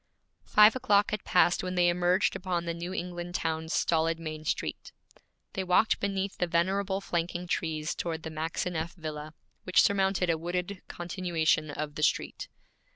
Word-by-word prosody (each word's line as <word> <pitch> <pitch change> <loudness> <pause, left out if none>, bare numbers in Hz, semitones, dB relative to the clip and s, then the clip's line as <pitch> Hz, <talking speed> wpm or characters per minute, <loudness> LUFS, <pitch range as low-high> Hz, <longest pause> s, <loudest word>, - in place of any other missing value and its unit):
Five 210 +2 +7
o'clock 205 -5 +3
had 210 -1 -2
passed 180 -1 +4
when 185 0 -4
they 175 -1 +4
emerged 180 +2 +2
upon 180 -2 -2
the 170 - -2
New 170 +2 -5
England 175 -1 -5
town's 160 -1 -2
stolid 165 -1 +1
main 155 -1 -6
street. - - -3 0.6
They 190 - -2
walked 185 +4 +3
beneath 195 -1 -2
the 180 - +1
venerable 190 +3 0
flanking 175 -1 -2
trees 160 -2 -2
toward 165 -2 -4
the 160 - -5
Maxineff 165 +2 -3
villa, 155 -2 -7 0.3
which 185 - +4
surmounted 190 -3 +2
a 160 - -1
wooded 180 +3 -3
continuation 170 -3 0
of 150 0 -4
the 150 - -6
street. 150 - 0
175 Hz, 155 wpm, -29 LUFS, 160-185 Hz, 0.6 s, Five